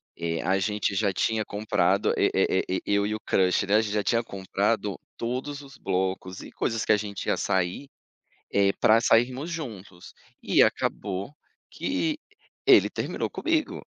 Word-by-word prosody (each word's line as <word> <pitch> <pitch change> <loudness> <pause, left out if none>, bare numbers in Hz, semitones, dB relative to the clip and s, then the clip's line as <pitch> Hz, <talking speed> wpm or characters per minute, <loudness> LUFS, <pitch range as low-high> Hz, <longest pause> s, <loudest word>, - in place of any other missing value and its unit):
eh, 85 -1 -3
a 95 +1 +2
gente 105 0 -1
já 100 0 +1
tinha 110 +3 0
comprado, 100 -3 +1
e - - +3
e 95 -1 +1
e 100 - 0
eu 100 0 +2
e 110 - -2
o - - -5
crush, 95 0 +1
né. 100 +2 +2
A 110 - +5
gente 105 -1 -3
já 105 - +1
tinha 115 +4 +1
comprado 95 -3 -1 0.2
todos 130 +5 -4
os 135 -1 -14
blocos 95 -1 -2
e - - -11
coisas 115 -1 -2
que - - +2
a 105 - +5
gente 100 -1 -5
ia - - +3
sair, 95 +8 -1 0.6
eh, 100 -1 +4
pra 115 +2 +5
sairmos 125 +7 +2
juntos. 105 - -8 0.3
E - - +4
acabou 100 +6 0 0.4
que 310 -1 -2 0.5
ele - - +7
terminou - - -3
comigo. 320 -2 -1
105 Hz, 165 wpm, -26 LUFS, 95-115 Hz, 0.6 s, ele